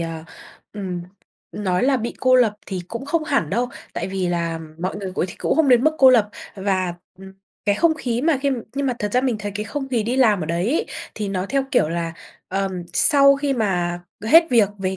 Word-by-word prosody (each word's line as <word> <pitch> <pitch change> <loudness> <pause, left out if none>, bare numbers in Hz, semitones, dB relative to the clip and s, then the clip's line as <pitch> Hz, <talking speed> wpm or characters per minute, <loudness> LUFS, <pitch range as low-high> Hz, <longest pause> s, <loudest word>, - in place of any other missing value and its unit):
ờ, 165 -1 -5 0.5
ừm, 190 -4 -5 0.5
nói 185 -3 -1
là 270 +1 +3
bị 235 -1 -4
cô 255 0 +4
lập 235 -4 +4
thì 190 -2 -4
cũng 235 +3 -6
không 310 +2 -1
hẳn 275 - 0
đâu, 245 +5 0 0.2
tại - - -3
vì 190 -1 -2
là 170 -1 -1 0.2
mọi 185 +4 -3
người 195 -2 -5
cũ - - 0
th 180 - -6
cũng - - 0
không 315 -4 +3
đến 245 0 +5
mức 310 0 +3
cô 265 -1 +8
lập 225 -5 +4 0.3
và, 190 -3 -1 0.2
ừm, 190 0 -12 0.3
cái 205 -1 +2
không 325 +8 +3
khí 245 -6 -2
mà 305 0 +2
khi 280 - +2 0.2
nhưng 280 0 -1
mà 255 - +1
thật 210 -1 -3
ra 250 - +3
mình 255 -4 0
thấy 205 -1 -5
cái 210 +1 -3
không 270 +6 -5
khí 240 -4 0
đi 240 +4 -2
làm 220 -7 +4
ở 155 - -3
đấy 170 +3 -1
ấy 320 - 0 0.3
thì 210 -2 -3
nó 190 -1 -2
theo 275 -1 0
kiểu 200 - +3
là, 165 0 -3 0.4
ờm, 190 -1 -2
sau 275 - +6
khi 280 0 -1
mà 175 -7 -1 0.2
hết 330 +9 +7
việc 225 -5 +4
về 190 0 -2
210 Hz, 235 wpm, -21 LUFS, 185-265 Hz, 0.5 s, cô